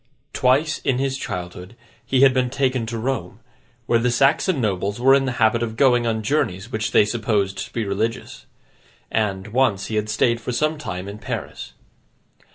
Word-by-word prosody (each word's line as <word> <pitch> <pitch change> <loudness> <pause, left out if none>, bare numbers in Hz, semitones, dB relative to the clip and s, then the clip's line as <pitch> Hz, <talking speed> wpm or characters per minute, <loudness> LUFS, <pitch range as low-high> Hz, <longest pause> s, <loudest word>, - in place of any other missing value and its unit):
Twice 135 +5 +2
in 130 - 0
his 135 0 -1
childhood, 90 -4 -6 0.3
he 130 +1 +1
had 135 -1 +6
been 125 -1 +1
taken 130 -3 -1
to 115 0 -4
Rome, 110 -5 -3 0.5
where 115 - +2
the 125 +1 +1
Saxon 135 +6 +2
nobles 100 -1 -1
were 135 +2 +5
in 135 0 +3
the 130 - -2
habit 115 0 +2
of 110 -1 -3
going 120 -3 +3
on 110 -1 -1
journeys 105 -4 -1
which 110 -1 -2
they - - +4
supposed 105 -3 -1
to - - -22
be 115 -2 -2
religious; 105 +4 -3 0.6
and, 100 -2 -1
once, 115 -5 +1
he 110 - -1
had 105 0 -1
stayed 115 +2 +1
for 125 - -4
some 155 +5 0
time 90 -9 -5
in 100 +1 -8
Paris. - - -6
115 Hz, 180 wpm, -22 LUFS, 105-130 Hz, 0.6 s, had